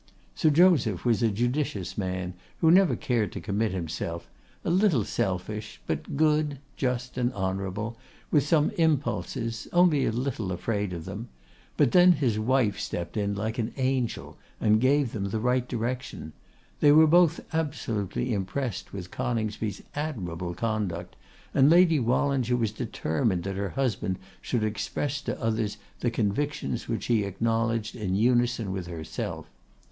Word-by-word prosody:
Sir 155 - +3
Joseph 150 - +4
was 115 -4 +2
a 115 - +4
judicious 110 - -1
man, 95 -2 -3 0.2
who 160 - +4
never 180 -7 +5
cared 115 -5 0
to - - -4
commit 105 +1 -1
himself; 85 -1 -4 0.4
a - - +1
little 180 - +3
selfish, 105 +4 -3
but - - -3
good, 150 -1 +2 0.2
just, 125 -1 -2
and 125 0 +1
honourable, 95 +3 -3 0.3
with 150 - +5
some 150 0 +3
impulses, 130 -7 0
only 175 -6 +4
a - - +1
little 115 -5 -2
afraid 100 +2 -2
of 85 -2 -6
them; 105 +5 -6 0.5
but - - +4
then 180 0 +7
his 120 -9 0
wife 110 -3 +2
stepped 85 -4 -4
in 100 -1 0
like 110 +4 -3
an 115 0 -2
angel, 130 -2 -1 0.2
and 110 0 +3
gave 135 -1 +3
them 100 -3 -3
the 100 +3 -2
right 125 +2 +1
direction. 120 - -4 0.5
They 145 - +6
were 155 +2 +8
both 170 +1 +5
absolutely 125 - -1
impressed 105 +4 -3
with 90 -3 -7
Coningsby's 110 -3 -2
admirable 90 - -4
conduct, 105 -7 -2 0.4
and 140 0 +5
Lady 170 -2 +6
Wallinger 125 0 +1
was 115 -3 0
determined 110 - -1
that 100 0 -3
her 100 0 -2
husband 110 -6 -1 0.2
should 120 -4 -1
express 140 +6 -2
to - - -4
others 110 -2 -1 0.2
the 120 - +1
convictions 115 - -1
which - - -2
he 115 -3 +2
acknowledged 115 +2 -1
in 95 -5 -2
unison 120 -1 +2
with 95 -2 -4
herself. 80 -3 -5
115 Hz, 150 wpm, -27 LUFS, 100-135 Hz, 0.5 s, were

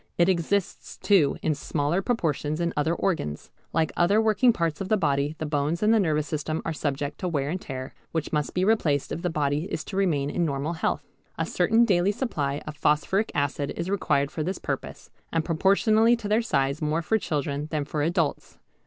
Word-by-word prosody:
It 170 - +4
exists 185 +2 -1
too 180 -9 +3
in 160 - +2
smaller 150 +4 -1
proportions 155 - -1
in 170 -1 0
other 160 +3 +1
organs. 120 - -2 0.2
Like 160 -1 +1
other 200 +5 +3
working 220 +3 +4
parts 165 -6 -2
of 195 - -4
the 215 - +4
body 145 -3 0
the 155 - -3
bones 150 +4 -1
and 215 +1 +5
the 225 - +4
nervous 155 -6 +1
system 155 +1 -2
are 165 - -1
subject 145 -1 -3
to 185 - -2
wear 145 -4 -1
and 185 +2 -3
tear, 130 -1 -6 0.2
which 160 -2 -3
must 150 -1 -1
be 180 +1 +2
replaced 160 -10 +1
if 170 - -3
the 180 - 0
body 150 0 0
is 155 - -4
to 195 - -8
remain 150 -8 +1
in 175 - 0
normal 145 +1 -1
health. 165 - -1 0.3
A - - 0
certain 230 +1 +3
daily 190 -2 +3
supply 145 - -2
of 150 - -6
phosphoric 150 +8 +1
acid 145 0 -1
is 170 +3 -2
required 140 -8 +1
for 155 - -4
this 185 +5 -2
purpose, - - -5 0.2
and 165 -1 0
proportionally 215 +7 +4
to 230 -3 -6
their 215 +3 +3
size 140 -8 0
more 155 +2 0
for 220 +7 +1
children 145 -3 -2
than 150 -2 -1
for 150 +1 -3
adults. 165 0 -1
160 Hz, 205 wpm, -26 LUFS, 145-190 Hz, 0.3 s, and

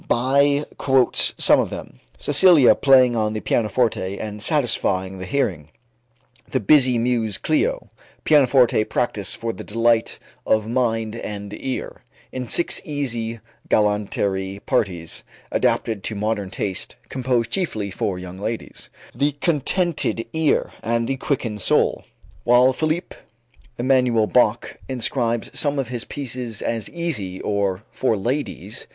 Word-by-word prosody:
Bie 140 +4 +3
quotes 130 -2 +2
some - - +5
of - - 0
them: 60 - -9 0.2
"Cecilia 150 -2 +5
Playing 130 -3 +5
on 110 -1 0
the 110 - -2
Pianoforte 105 -4 0
and 105 -1 -6
Satisfying 95 - +1
the 90 - -6
Hearing"; 90 - -1 0.8
"The 130 - 0
Busy 130 +1 +4
Muse 115 -3 0
Clio"; - - -1 0.3
"Pianoforte 130 -6 +4
Practice 105 -6 -1
for 115 0 -4
the - - -8
Delight 115 +1 +1 0.3
of 110 -1 +1
Mind 115 -2 -1
and 100 -2 -6
Ear, 130 +4 -5 0.3
in 130 -1 -4
Six 170 +8 +2
Easy 120 -7 -3 0.3
Galanterie 100 -2 0
Parties 85 -5 -1 0.3
Adapted 110 -4 0
to 110 - -2
Modern 105 -1 -2
Taste, 95 -2 -4
Composed 125 -3 -1
Chiefly 110 - -1
for 95 0 -2
Young 90 +1 -8
Ladies"; 110 +3 -4 0.2
"The 140 +4 0
Contented 150 -3 0
Ear 160 -2 +1
and 115 0 0
the 135 - -1
Quickened 120 -7 -2
Soul"; - - +2 0.4
while 125 +2 +5
Philipp 155 +5 -2 0.6
Emanuel 125 -3 +3
Bach 120 0 +1
inscribes 120 -2 -1
some 145 -1 +1
of 135 -4 -2
his 120 -2 -3
pieces 125 -5 -5
as 115 -2 -2
"easy" 110 - -3
or 100 -1 -1
"for 115 -4 0
ladies." 120 - -3
115 Hz, 130 wpm, -22 LUFS, 105-135 Hz, 0.8 s, some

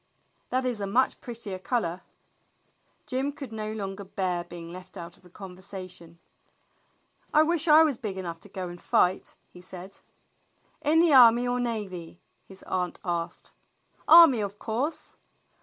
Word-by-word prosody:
"That 255 +1 0
is 240 -4 -2
a 200 - -2
much 245 +6 +1
prettier 225 -6 -6
color." 185 -4 -2 1.0
Jim 265 +2 -1
could 275 -4 -9
no 215 -1 -4
longer 200 -2 -5
bear 185 -2 -2
being 175 -1 -10
left 180 +3 -10
out 170 0 -8
of - - -24
the 180 - -18
con 185 0 -10
versation. 185 -3 -9 1.1
"I 305 0 +5
wish 330 0 0
I 310 +1 +8
was 295 -6 +1
big 205 -5 -5
enough 170 -3 -5
to - - -16
go 185 -1 -5
and 175 0 -10
fight," 180 +1 +1 0.2
he 180 - -13
said. 185 +2 -8 0.8
"In 315 +3 +4
the 335 -3 +4
army 245 -1 +7
or 245 0 0
navy?" 195 -8 -4 0.3
his 190 0 -12
aunt 180 -1 -2
asked. 170 -1 -4 0.6
"Army, 325 -7 +9
of 200 0 -4
course." 240 +9 -4
200 Hz, 155 wpm, -27 LUFS, 180-250 Hz, 1.1 s, Army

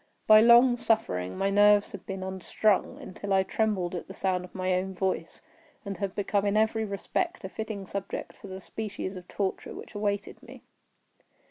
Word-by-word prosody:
By 215 0 +8
long 240 +2 +7
suffering 95 - 0
my 195 0 +1
nerves 205 0 +5
had 200 - -10
been 190 -1 -4
unstrung, 190 +2 0
until 200 +2 -7
I 190 0 +4
trembled 190 -3 -1
at 175 - -5
the 190 - -10
sound 185 -2 0
of 180 - -13
my 185 0 0
own 185 +1 -1
voice, 185 -3 -2 0.4
and 200 -1 -4
had 200 -2 -3
become 200 0 0
in 205 +1 +1
every 220 +1 +2
respect 335 - -3
a 190 - -5
fitting 215 -1 -5
subject 195 +1 -5
for - - -12
the 190 0 -7
species 205 -1 -5
of 180 -1 -10
torture 195 -2 -3
which - - -10
awaited 205 -1 -2
me. - - -13
200 Hz, 185 wpm, -28 LUFS, 190-215 Hz, 0.4 s, By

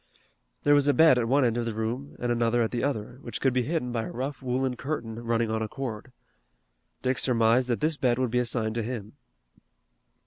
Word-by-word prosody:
There 145 - +5
was 145 -1 +4
a 145 - +4
bed 160 -6 +6
at 115 - 0
one 135 +2 +3
end 115 -1 +1
of 120 - -1
the 115 -2 -3
room 120 +6 -3
and 120 0 -1
another 120 0 +2
at 110 - -2
the 120 - -2
other, 125 -3 -3
which - - -6
could 135 -2 +2
be 125 - +2
hidden 125 -1 -2
by 115 -2 -2
a - - -6
rough 135 +4 -4
woolen 130 0 -1
curtain 120 -5 -4
running 115 -1 0
on 110 0 -1
a 110 - -1
cord. 125 -1 -6 0.9
Dick 130 0 +1
surmised 120 0 +3
that 120 -2 -1
this 155 0 +1
bed 125 -3 +2
would 130 -3 0
be 125 - +2
assigned 115 -2 -1
to 115 - -1
him. 110 -2 -5
125 Hz, 220 wpm, -27 LUFS, 115-130 Hz, 0.9 s, bed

